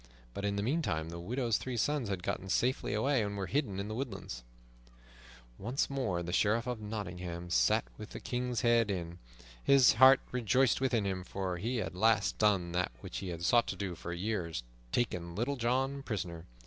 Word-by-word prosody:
But 100 - -4
in 100 0 0
the 100 - -1
meantime 110 - 0
the 85 0 -6
widow's 115 +5 0
three 130 -2 -4
sons 140 -1 0
had 95 -3 -3
gotten 95 - -3
safely 125 -1 +1
away, 130 +4 +2
and 100 -1 -2
were 95 - -2
hidden 110 -6 -1
in 100 - -3
the 110 - -4
woodlands. 100 - -5 1.2
Once 125 +7 -1
more 95 -11 -1
the 85 +1 -4
Sheriff 110 +4 +2
of 125 -3 -3
Nottingham 90 -5 -5
sat - - +3
within 105 - -8
the - - -5
King's 125 -1 -2
Head 120 -3 +4
Inn. 85 -3 -4 0.4
His 140 -2 +6
heart 130 +3 +8
rejoiced 125 +2 +2
within 120 -6 +1
him, 95 -2 -2
for 95 -1 -3
he 120 +7 -2
had 110 - -1
at - - -15
last 110 +3 +2
done 100 -5 +3
that 90 +1 0
which - - -5
he 95 - -5
had 85 -1 -4
sought 120 +6 +4
to - - -3
do 95 -3 -3
for 85 0 -7
years, 85 - -2 0.3
taken 90 -8 -1
Little 120 +7 0
John 135 +3 0
prisoner. 90 -9 -4
105 Hz, 195 wpm, -32 LUFS, 90-125 Hz, 1.2 s, heart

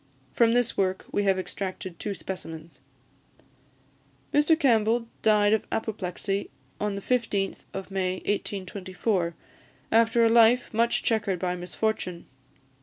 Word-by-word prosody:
From 230 -1 +4
this 245 -1 +2
work 190 -1 0
we 205 - 0
have 195 -1 +3
extracted 185 -1 -5
two 205 -1 -3
specimens. 165 -6 -7 1.5
Mr 300 +2 +4
Campbell 230 -3 +3
died 210 -1 +4
of 220 - 0
apoplexy 200 -2 -2 0.3
on 210 -1 -1
the 200 - -6
15th 210 -6 -1
of 195 0 -7
May 185 -1 0
1824, 190 -2 -2 0.6
after 230 +1 +4
a - - +5
life 235 +2 +5
much 230 +2 +2
chequered 210 -5 +1
by 180 0 -1
misfortune. 180 0 -3
205 Hz, 120 wpm, -27 LUFS, 185-225 Hz, 1.5 s, a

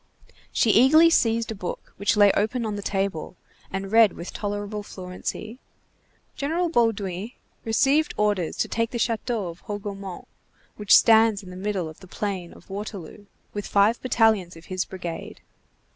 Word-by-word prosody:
She 225 - +3
eagerly 310 +9 +6
seized 230 -6 +2
a - - -2
book 185 -4 -7
which 200 +2 +1
lay 205 -1 +7
open 225 +5 0
on 215 -1 -2
the 205 - -4
table, 195 -4 -3 0.3
and 195 0 -4
read 225 -3 +6
with 170 - -8
tolerable 205 0 -4
fluency:— 195 +5 -7 0.8
"—General 330 +4 -1
Bauduin 215 - 0 0.3
received 275 +7 +2
orders 205 -5 0
to - - 0
take 230 0 -1
the 240 - -4
château 230 -4 -1
of 165 - -16
Hougomont 200 -3 -6 0.5
which 210 -1 +6
stands 220 -2 +5
in 185 - -11
the - - -9
middle 190 -2 -2
of 155 - -11
the 190 - -14
plain 190 -2 -4
of 185 - -16
Waterloo, 205 0 -7 0.3
with 205 -1 -4
five 210 +3 +3
battalions 220 -8 +2
of 165 - -14
his 185 0 -1
brigade." 175 -3 -7
205 Hz, 160 wpm, -25 LUFS, 190-225 Hz, 0.8 s, lay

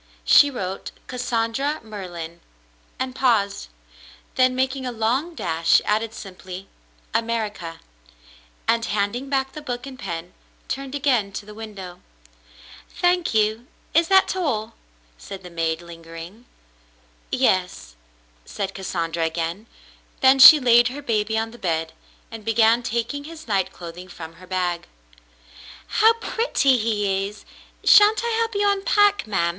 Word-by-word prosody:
She 290 - +7
wrote 195 -8 -5 0.2
"Cassandra 250 +3 -1
Merlin 175 -6 -8 0.2
— - - -35
" - - -35
and 260 0 -2
paused; 225 - +1 0.7
then, 255 0 +3
making 260 +1 -1
a 250 - -3
long 245 +9 -1
dash, 165 - +2
added 220 +1 0
simply, 185 0 -9 0.5
"America,'* 215 -7 -3 0.9
and, 230 0 +2
handing 210 +6 -2
back 270 -1 0
the 305 - -8
book 250 -3 -5
and 265 -2 -10
pen, 170 +1 -6 0.3
turned 275 0 -4
again 250 -8 +1
to 205 - -6
the 210 - -11
window. 205 -5 -9 0.9
"Thank 355 -6 +1
you. 220 +3 +1 0.3
Is 330 +1 +4
that 380 0 +4
all 230 - -2 0.2
?'' - - -35
said 195 -1 -9
the 180 - -10
maid, 165 0 -2
lingering. 165 +6 -11 0.8
"Yes," 180 - 0 0.5
said 195 - -5
Cassandra 165 -3 -3
again; 165 +6 -3 0.5
then 265 +1 +6
she 300 +3 +11
laid 240 -2 +5
her 280 +3 -6
baby 220 -3 0
on 225 0 -2
the 240 - -14
bed 160 -2 -2 0.4
and 225 -1 -8
began 225 +1 +3
taking 235 +5 -3
his 315 -2 -11
night 190 -3 0
clothing 175 +1 -10
from 165 -2 -10
her 185 - -13
bag. 180 -2 -2 1.0
"How 445 +1 +4
pretty 450 - +1
he 205 -3 0
is! 210 +1 -12 0.4
Shan't 420 +2 +6
I 470 - -1
help 455 -1 -1
you 405 0 +2
unpack, 405 - +2
ma'm 170 -5 +1
220 Hz, 140 wpm, -23 LUFS, 180-265 Hz, 1.0 s, she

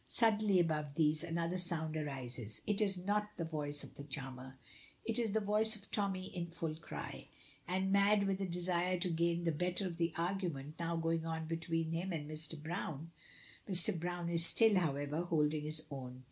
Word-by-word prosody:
Suddenly 215 -4 +3
above 150 -4 0
these, 155 0 +3
another 170 +1 -1
sound 160 -3 -1
arises. 125 -7 -4
It 210 0 +1
is 195 -3 +2
not 205 +3 0
the 165 - -1
voice 145 -2 -3
of - - -10
the 140 - -8
charmer. 130 -2 -7 0.5
It 230 +1 -1
is 225 -4 0
the 220 - +3
voice 215 +2 +2
of 205 -1 -12
Tommy 190 -3 -1
in 170 -1 -2
full 165 -2 -3
cry, 160 +1 -7 0.4
and 190 +2 0
mad 200 +1 +5
with 195 0 0
a 195 - 0
desire 180 +1 +1
to 180 0 -1
gain 170 +1 +1
the 165 - +2
better 180 +5 -1
of 175 -3 -4
the 170 -1 +1
argument 170 -5 -2
now 170 0 -1
going 165 0 0
on 160 0 -2
between 165 0 -1
him 175 +3 -1
and 155 -3 -3
Mr. 155 +1 -4
Browne. 160 -1 -4 0.6
Mr. 185 +2 +5
Browne 175 0 -2
is 170 -1 +4
still, 220 +6 +6
however, 145 -1 -1
holding 155 -3 +1
his 155 +1 +2
own. 130 -2 -6
170 Hz, 190 wpm, -36 LUFS, 155-185 Hz, 0.6 s, still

